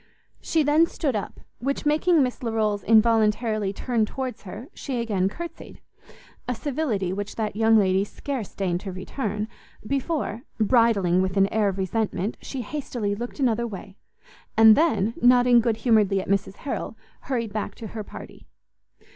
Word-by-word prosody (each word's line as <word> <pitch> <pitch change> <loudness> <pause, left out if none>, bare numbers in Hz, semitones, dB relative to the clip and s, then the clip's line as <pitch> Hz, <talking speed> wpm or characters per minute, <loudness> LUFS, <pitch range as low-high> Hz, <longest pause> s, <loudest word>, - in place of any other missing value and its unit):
She 320 -2 +1
then 300 +3 +4
stood 280 -8 -2
up, 205 - -5 0.2
which 275 +5 -2
making 310 +1 +3
Miss 250 -1 -2
Larolles 215 -4 0
involuntarily 220 -1 +3
turn 230 +2 -1
towards 260 +1 -5
her, 210 +6 -9
she 260 -4 -4
again 200 -5 0
courtsied; 340 +10 -9 0.7
a 250 - -1
civility 230 - -2
which 205 +1 -5
that 215 -2 -2
young 225 +1 +4
lady 190 -1 +3
scarce 245 +1 -5
deigned 180 -3 -1
to 195 0 -6
return, 210 +2 -4 0.4
before, 275 -2 -2 0.2
bridling 215 -6 +3
with 190 +1 -1
an 195 0 +5
air 215 -2 +2
of 190 - -4
resentment, 200 +1 -1
she 265 -3 -5
hastily 240 -5 -3
looked 240 +7 -6
another 235 -3 +1
way, 195 -2 -9 0.6
and 220 -1 +8
then, 230 - +2
nodding 245 0 +6
good 230 -1 +1
humouredly 210 -4 +4
at - - -5
Mrs 195 0 0
Harrel, 280 - -4 0.3
hurried 230 -6 -2
back 215 -1 -3
to 225 - -9
her 220 -2 -4
party. - - -12
220 Hz, 155 wpm, -25 LUFS, 200-250 Hz, 0.7 s, and